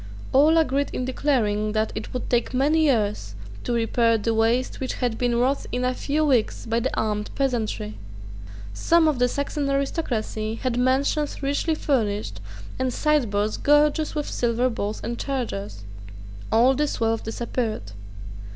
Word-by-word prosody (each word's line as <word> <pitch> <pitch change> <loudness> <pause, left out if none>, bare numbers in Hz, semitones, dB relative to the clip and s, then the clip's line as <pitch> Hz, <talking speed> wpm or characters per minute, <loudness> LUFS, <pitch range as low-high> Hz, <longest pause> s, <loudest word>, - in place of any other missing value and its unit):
All 300 +5 +5
agreed 285 -3 +2
in 255 - -2
declaring 215 -6 0
that 215 0 0
it - - -6
would 250 - -4
take 240 +1 0
many 305 +5 +3
years 210 - 0 0.3
to - - -3
repair 230 0 +2
the 225 +2 -1
waste 230 +3 +1
which 260 - -3
had 245 -3 -1
been 245 0 0
wrought 255 +4 +1
in 250 0 -1
a 255 - +1
few 295 +4 0
weeks 255 -7 +1
by 230 +1 0
the 250 - -2
armed 210 -1 -1
peasantry, 220 - -2 0.7
Some 330 - +3
of 295 -5 +1
the 250 - +4
Saxon 280 +2 -2
aristocracy 245 -6 -2
had 250 0 -2
mansions 275 +4 +1
richly 285 +3 0
furnished, 210 - -1 0.4
and 260 -1 0
sideboards 230 -8 +1
gorgeous 295 +2 +3
with 295 -1 -2
silver 240 +1 0
bowls 210 -1 -3
and 235 0 -4
chargers. 105 - -4 0.7
All 240 +4 +5
this 295 +2 -1
wealth 225 0 0
disappeared. 225 - -3
245 Hz, 150 wpm, -24 LUFS, 220-280 Hz, 0.7 s, All